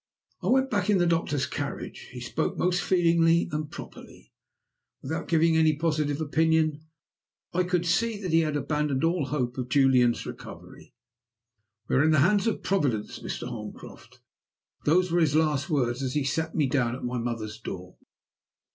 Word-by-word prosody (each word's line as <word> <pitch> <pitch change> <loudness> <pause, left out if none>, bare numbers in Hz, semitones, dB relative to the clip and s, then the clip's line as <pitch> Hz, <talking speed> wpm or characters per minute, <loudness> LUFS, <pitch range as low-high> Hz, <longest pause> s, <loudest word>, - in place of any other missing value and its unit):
I - - -4
went 265 +1 +3
back 205 -2 0
in 205 - +4
the 175 - +2
doctor's 165 -5 0
carriage. - - -6
He - - -8
spoke - - -2
most 180 0 +1
feelingly 170 -2 +3
and 150 0 -3
properly. - - -12 0.7
Without - - -4
giving 165 0 +3
any 160 -1 +4
positive 150 -2 -1
opinion, 160 0 +1 0.7
I 180 - +2
could 180 -1 0
see 215 +6 +1
that 185 -4 -4
he 165 - +6
had 155 -2 0
abandoned 150 -1 -1
all 165 -2 +1
hope 130 -4 -2
of 125 -1 -4
Julian's 130 -3 +3
recovery. - - -11 0.9
'We - - 0
are 135 - +4
in 155 - +3
the 155 -2 +4
hands 205 +2 +2
of 225 - -1
Providence, 140 - -1
Mr. - - -5
Holmcroft;' - - -10 0.6
those 180 +4 +3
were 175 - +2
his 150 -3 +2
last 155 -1 +1
words 125 -4 0
as 130 0 -3
he 145 - +1
set 160 +4 -2
me 150 - +2
down 125 -3 0
at - - -9
my 125 0 -2
mother's 115 -2 -4
door. 90 -4 -8
155 Hz, 170 wpm, -27 LUFS, 135-170 Hz, 0.9 s, he